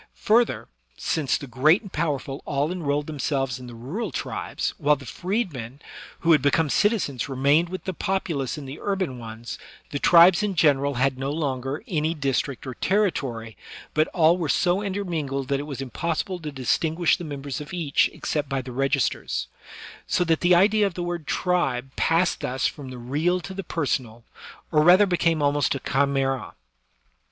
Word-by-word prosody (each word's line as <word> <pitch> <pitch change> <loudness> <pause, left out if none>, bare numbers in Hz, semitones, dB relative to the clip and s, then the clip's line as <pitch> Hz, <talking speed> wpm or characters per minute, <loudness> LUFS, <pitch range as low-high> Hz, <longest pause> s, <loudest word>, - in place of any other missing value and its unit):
Further, 230 +2 +3 0.3
since 150 -5 0
the - - -8
great 150 - +3
and 195 - -11
powerful 145 -3 -2
all 145 +3 0
enrolled 150 -5 -1
themselves 135 -4 -2
in 125 - -9
the 120 - -9
rural 165 - -4
tribes, - - -3
while 150 +1 +4
the 135 - -12
freedmen 160 - -3 0.4
who 165 - +3
had 155 -4 +6
become 145 +2 +2
citizens 200 - +1
remained 140 +6 +2
with 185 +1 -6
the 190 - -3
populace 165 -8 -2
in 145 - -7
the 135 +2 -8
urban 190 -11 -2
ones, 115 +1 -8 0.3
the 145 - -2
tribes 175 +5 +7
in 205 -2 -1
general 140 -3 +3
had 130 +1 +1
no 135 +1 -2
longer 140 -2 -2
any 160 -1 0
district 135 -2 -1
or 130 - -5
territory, 135 - -1 0.4
but 155 +1 +3
all 170 0 +3
were 160 -4 -2
so 180 +2 +2
intermingled 165 -9 -3
that 140 -1 +1
it 145 - -5
was 135 -2 -5
impossible 170 - -3
to 155 -3 -6
distinguish 160 +5 +1
the 175 - -7
members 145 -2 -5
of 145 - -9
each 165 -6 +1
except 150 -3 -3
by 135 -1 -1
the 125 - -8
registers; 135 +2 -1 0.6
so - - +2
that 165 -2 +1
the 175 0 +5
idea 205 +3 +4
of 185 - -7
the 175 - -3
word 175 -3 -4
tribe 135 -8 0
passed 170 +2 +2
thus 130 +1 -2
from 140 -3 -3
the 130 - -8
real 150 +9 0
to 190 +2 -8
the 195 +1 -5
personal, 130 -9 -2 0.5
or 150 - +4
rather 180 +5 +7
became 170 -4 +1
almost 145 -1 +2
a - - -3
chimera. 135 -7 0
150 Hz, 175 wpm, -24 LUFS, 135-175 Hz, 0.6 s, tribes